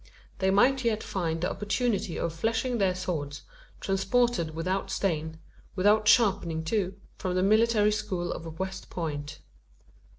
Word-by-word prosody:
They 190 - +2
might 255 +7 +4
yet 220 -2 0
find 165 -4 -2
the 180 - 0
opportunity 205 -3 -1
of 170 - -2
fleshing 225 +7 -1
their 190 -2 +2
swords, 155 -6 -4 0.4
transported 195 -3 +1
without 185 +4 -2
stain 160 -5 -1 0.4
without 210 +3 +3
sharpening, 190 -8 +3
too 190 +2 -1 0.2
from 185 -1 -2
the 185 - +2
military 215 +1 +4
school 200 -5 -2
of 160 -1 -8
West 190 +1 -5
Point. 150 -3 -5
190 Hz, 135 wpm, -28 LUFS, 165-215 Hz, 0.4 s, might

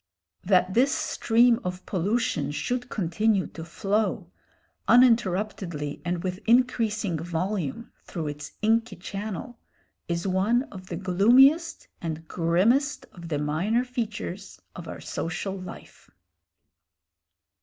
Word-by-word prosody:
That 185 -1 +3
this 260 +6 +4
stream 235 -1 +3
of 180 0 -5
pollution 185 - 0
should 245 +11 -3
continue 200 +1 +1
to 165 - -9
flow, 205 +5 -1 0.6
uninterruptedly 195 - +2
and 175 -1 -2
with 185 0 -3
increasing 225 -7 +2
volume, 175 - -3
through 160 -4 -4
its 145 -1 -8
inky 225 +2 +2
channel, 205 +5 -6 0.5
is 170 +1 -2
one 200 +6 +2
of 185 -2 -10
the 175 - -4
gloomiest 245 - +4
and 160 -1 -5
grimmest 205 - +1
of 170 -2 -10
the 155 -3 -1
minor 170 +12 0
features 215 -6 -5 0.2
of 170 -2 -8
our - - -7
social 180 +4 -3
life. 185 -2 -11
195 Hz, 110 wpm, -26 LUFS, 170-230 Hz, 0.6 s, this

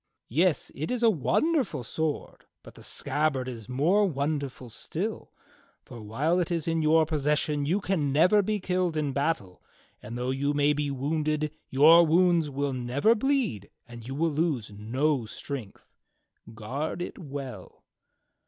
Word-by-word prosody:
Yes, 165 +6 +1
it 155 +3 -4
is 250 -1 -1
a 230 - +6
wonderful 235 - 0
sword, 155 +5 -3 0.2
but - - -13
the - - -15
scabbard 145 -4 -1
is 115 -4 -7
more 160 +11 +3
wonderful 140 -4 -3
still; 115 - -5 0.5
for 120 - -10
while 145 +12 0
it 180 - 0
is 170 -2 -2
in 165 0 +1
your 160 +1 +4
possession 150 -1 0
you 185 +6 +2
can 175 -8 0
never 180 +9 +5
be 210 +1 -1
killed 180 -3 -1
in 145 -3 -1
battle, 140 - -2 0.4
and 115 +3 -7
though 125 +1 -1
you 140 +2 -1
may 145 0 +3
be 145 0 -1
wounded 150 +2 -1 0.2
your 160 +6 +7
wounds 170 -1 +3
will 140 0 -2
never 130 - +2
bleed 235 - -1 0.2
and 120 -1 -10
you 135 - -5
will 165 +2 +1
lose 145 -8 -1
no 120 +5 -1
strength. 120 -3 -7 0.7
Guard 135 +10 -4
it - - -8
well." 135 - -8
150 Hz, 155 wpm, -27 LUFS, 130-165 Hz, 0.7 s, your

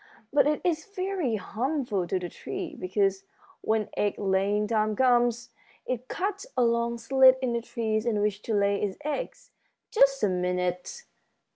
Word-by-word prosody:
But 290 0 +5
it 300 0 +1
is 325 -3 0
very 370 - -1
harmful 220 - -2
to 190 - 0
the 180 -1 -4
tree, 350 - -6
because 195 -3 0 0.4
when 220 -1 0
egg 205 - 0
laying 200 +1 +1
time 215 -1 +1
comes 240 -1 +2 0.3
it 255 0 -3
cuts 395 - -3
a 250 - +4
long 235 0 +1
slit 260 +2 +5
in 255 -2 -1
the 235 - -1
trees 220 -2 -2
in 215 -3 +1
which 205 0 0
to 225 - 0
lay 200 0 +2
its 200 -2 -2
eggs. 305 +12 -4 0.4
Just 275 - +4
a - - +5
minute!" 180 - -2
230 Hz, 160 wpm, -27 LUFS, 200-270 Hz, 0.4 s, But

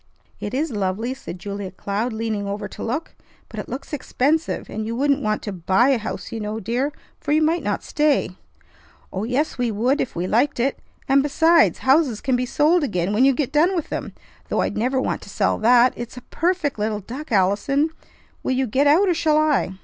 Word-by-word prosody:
"It 205 - -4
is 300 +2 -1
lovely!" 210 +4 -2
said 265 -9 -8
Julia 200 +1 -5
Cloud, 200 +5 -3
leaning 220 -2 -3
over 200 +1 -4
to - - -10
look. 265 +8 -3 0.4
"But - - -7
it - - -6
looks 270 +3 -7
expensive, 295 +3 0
and 220 - -4
you 225 +2 -3
wouldn't 280 +2 +2
want 215 -3 -1
to 205 - -4
buy 190 +7 +2
a 265 -4 +3
house, 215 - -6
you 230 - -4
know, 210 +1 -3
dear; 245 +7 -1 0.3
for - - -4
you 310 +1 +4
might 330 +2 +2
not - - -2
stay." 300 - +1 0.8
"Oh, 190 +3 -2
yes, 255 +4 -1
we 245 -1 +1
would 240 +7 +1
if - - -4
we 175 +1 -2
liked 240 +8 +1
it. 265 +4 0 0.3
And, 275 0 +5
besides, 320 +4 +4
houses 265 -4 +3
can 265 -3 0
be 250 0 -1
sold 310 +6 +3
again 190 -6 -1
when 240 +5 +4
you 275 - +5
get 275 -2 -1
done 335 +6 +3
with 335 - -2
them, - - -4 0.4
though - - +1
I'd - - -1
never 255 +4 0
want - - -2
to - - -12
sell - - 0
that! 240 +2 +5
It's 240 +1 -7
a - - -7
perfect 330 - 0
little 210 0 -1
duck. 260 +9 -8
Allison, 215 - +2 0.5
will - - -1
you 260 +1 +1
get 265 +5 +2
out 340 +8 +5
or 360 - +3
shall 310 -2 +2
I?" 300 -11 +2
250 Hz, 215 wpm, -22 LUFS, 215-295 Hz, 0.8 s, And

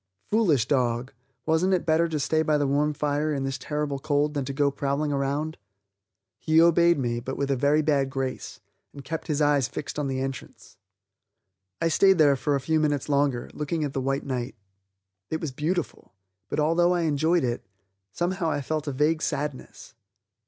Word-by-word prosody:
Foolish 175 - +3
dog, 125 -2 0 0.3
wasn't 165 +4 +2
it 180 - -2
better 165 +1 +3
to 155 -2 -2
stay 155 +3 +1
by 155 -1 +2
the 145 - +1
warm 145 +2 +1
fire 150 +1 -1
in 140 -2 -2
this 135 0 -3
terrible 150 -2 -3
cold 145 +1 0
than 145 -2 -1
to 140 - -4
go 140 +1 +1
prowling 140 +2 -1
around. 140 +3 -2 0.8
He 160 0 +3
obeyed 170 0 +5
me, 120 -3 -1
but 130 +2 -5
with 140 0 -1
a - - +2
very 145 +4 +2
bad 140 -3 +1
grace, 130 -4 -4 0.3
and 140 - -10
kept 160 +3 -5
his 150 -1 +1
eyes 145 -4 +3
fixed 150 - -6
on 145 - -1
the 130 -1 -2
entrance. 135 -1 -7 1.0
I 165 - +1
stayed 190 +3 +4
there 145 -3 +5
for 145 +2 0
a - - 0
few 160 +4 0
minutes 145 -2 0
longer, 140 -3 0
looking 150 +2 -2
at 140 -2 -3
the 135 - -1
white 135 +1 -1
night. 125 -2 -3 0.7
It 160 - -2
was 155 - -4
beautiful, 155 - -3 0.3
but - - -2
although 170 +4 +3
I 175 - 0
enjoyed 160 +1 +2
it, 120 -1 -2 0.5
somehow 175 - -1
I 145 - -1
felt 155 +2 -3
a - - 0
vague 150 +4 +1
sadness. 145 -2 -4
145 Hz, 190 wpm, -26 LUFS, 135-160 Hz, 1.0 s, obeyed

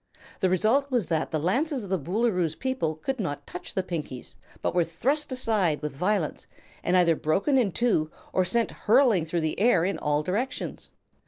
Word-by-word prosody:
The 185 - +2
result 225 +10 +2
was 245 -7 +1
that 160 -1 -1
the 160 - -1
lances 255 - 0
of 195 - -8
the 190 - +1
Boolooroo's 180 - 0
people 260 -12 -2
could 260 - -4
not 145 -7 -3
touch 180 - -7
the 190 - +1
Pinkies, 155 -8 -5 0.3
but - - 0
were 175 - +3
thrust 265 - -1
aside 210 -12 +1
with 150 - -3
violence 185 0 -1 0.4
and 180 +1 +3
either 170 -2 +4
broken 190 - +1
in 240 -7 +3
two 185 -9 +1 0.2
or 185 - +3
sent 230 +5 +1
hurling 225 - +3
through 165 +1 -1
the 155 +2 -2
air 195 -6 +4
in 195 - -1
all 150 0 0
directions. 210 +11 -3
185 Hz, 185 wpm, -26 LUFS, 160-235 Hz, 0.4 s, either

